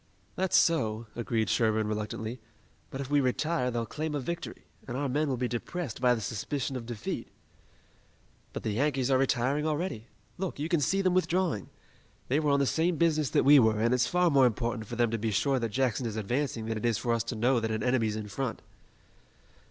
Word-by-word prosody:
"That's 190 -1 +2
so," 115 -9 +2
agreed 115 -2 -1
Sherburne 110 -1 +2
reluctantly, 110 +3 -4 0.5
"but 135 - -5
if 140 +1 -6
we 145 -1 +4
retire 130 +1 0
they'll 120 -1 -2
claim 150 +6 -4
a - - 0
victory, 170 +5 -5 0.2
and 125 -1 -4
our 140 +1 -1
men 145 +3 0
will 130 - -1
be 125 +1 0
depressed 125 +4 -4
by 125 -1 +4
the 115 - -5
suspicion 130 +5 -3
of 120 -3 -5
defeat." 115 -3 -4 1.2
"But - - -6
the 110 - -1
Yankees 135 +2 0
are 130 - +4
retiring 135 +3 +1
already. 150 - -2 0.3
Look, 190 -2 -3
you 150 +3 -3
can 170 -2 +2
see 195 +8 +1
them 185 -1 +2
withdrawing! 180 - 0 0.6
They 140 +4 +3
were 150 -2 +1
on 140 0 +3
the 140 - +3
same 165 +5 +1
business 155 -3 +2
that - - +2
we 145 +1 +8
were, 110 -3 +3
and 115 +3 +2
it's 125 -2 +2
far 180 -1 +2
more 135 -3 +6
important 115 -1 -2
for 120 - -6
them 120 -1 +2
to 115 - -1
be 110 +1 -1
sure 125 +6 +1
that 115 -1 -2
Jackson 125 +1 0
is 110 - -5
advancing 115 +2 -2
than 110 -1 -2
it 110 - -4
is 115 - +1
for 120 -2 0
us 115 -1 0
to 120 - -4
know 120 +3 +2
that 110 0 -2
an 110 -1 -2
enemy's 120 -4 +1
in 110 -1 -5
front." 125 +3 -4
125 Hz, 215 wpm, -29 LUFS, 115-145 Hz, 1.2 s, we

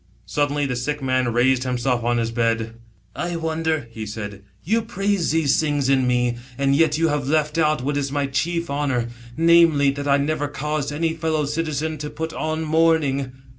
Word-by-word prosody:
Suddenly 145 0 0
the 130 -2 -2
sick 145 +4 -3
man 130 -2 +1
raised 125 +2 +2
himself 125 -1 -1
on 120 0 +1
his 115 -1 -1
bed. 115 -1 0 0.2
" 95 - -36
I 175 0 -3
wonder," 160 -4 -1
he 110 -1 -6
said, 105 -1 -6
" 95 - -35
you 225 +6 +1
praise 200 -5 -1
these 155 -3 +2
things 145 -3 0
in 130 -2 +3
me, 125 -1 +1 0.2
and 140 0 +2
yet 160 +1 +3
you 165 0 +2
have 145 -3 -1
left 150 +1 +1
out 155 -4 +2
what 145 +2 -1
is 140 -1 -2
my 145 0 0
chief 170 +6 -1
honour 135 -5 -1 0.3
namely, 165 -4 +5
that 145 +1 -5
I 140 0 +4
never 145 +1 -1
caused 145 0 -3
any 160 +2 0
fellow 160 -2 -1
citizen 155 0 -2
to 150 0 -4
put 160 +2 -5
on 155 +1 -2
mourning." 155 -4 +2
145 Hz, 195 wpm, -22 LUFS, 130-160 Hz, 0.3 s, namely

